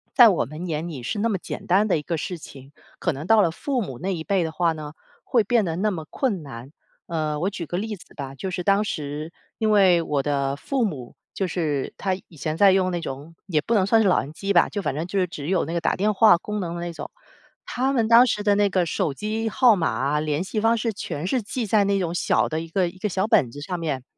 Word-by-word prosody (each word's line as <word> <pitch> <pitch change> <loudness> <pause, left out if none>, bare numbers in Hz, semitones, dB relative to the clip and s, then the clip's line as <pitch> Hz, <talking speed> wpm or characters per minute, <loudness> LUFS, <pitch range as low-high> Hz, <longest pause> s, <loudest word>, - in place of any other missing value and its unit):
在 240 -4 +9
我 180 - +1
们 155 +7 -7
眼 160 0 -3
里 140 -7 -7
是 205 - -3
那 230 +2 +1
么 195 - 0
简 - - -7
单 195 +4 +3
的 180 - +2
一 - - -6
个 165 +2 -3
事 180 +2 -4
情， 135 -2 -13 0.3
可 175 - 0
能 150 +5 -7
到 225 -1 +6
了 165 - +2
父 265 - -2
母 135 - -6
那 195 +2 -2
一 160 -2 -4
辈 190 -2 +1
的 160 - -3
话 170 +1 +1
呢， 155 -1 -7 0.3
会 235 -4 +2
变 230 0 +2
得 165 -3 -2
那 210 +4 0
么 160 -4 -4
困 215 - -1
难。 135 -1 -10 0.4
呃， 155 -3 -2
我 190 - +1
举 170 -5 -6
个 175 - -3
例 215 +1 -3
子 175 - -18
吧， 135 -2 -6
就 190 +8 -5
是 180 -1 -3
当 200 +2 +3
时 155 -3 -4 0.3
因 220 -1 +1
为 190 -5 +5
我 145 -4 -1
的 140 -1 0
父 260 - -1
母 135 - -4 0.2
就 195 - 0
是 155 -6 -2
他 190 -1 -1
以 165 - -18
前 155 +3 -3
在 200 -1 +6
用 185 -1 +2
那 175 -1 -2
种， 145 +5 -7
也 160 -6 0
不 230 +8 0
能 190 -2 +3
算 225 +2 +4
是 205 - +3
老 180 - +4
人 145 +3 -9
机 195 +5 -3
吧， 175 - +5
就 205 - -3
反 150 -5 -2
正 160 +3 -2
就 195 +2 -2
是 180 - +1
只 145 -4 -7
有 185 -4 +1
那 165 - -5
个 - - +1
打 - - 0
电 210 +3 +1
话 210 -2 +6
功 210 +3 -5
能 170 -2 -3
的 170 - -5
那 175 0 -4
种。 165 - -8 0.6
他 260 +2 0
们 230 -5 +1
当 235 +2 +7
时 210 -2 -1
的 205 -1 +3
那 205 -1 +3
个 180 -2 +1
手 155 - -1
机 220 +6 -2
号 240 -1 +5
码 145 - 0
联 150 +2 -1
系 200 +3 -3
方 230 +1 +3
式 225 0 -1
全 160 -4 -5
是 250 +5 0
记 230 +3 -4
在 210 0 +3
那 200 0 +1
种 170 -2 -2
小 175 - +1
的 160 0 -2
一 165 - -7
个 180 +1 +1
一 175 - -9
个 210 +1 -1
小 190 +2 0
本 130 - +3
子 145 - -9
上 175 +3 -4
面。 140 -6 -3
180 Hz, 295 characters per minute, -24 LUFS, 155-205 Hz, 0.6 s, 在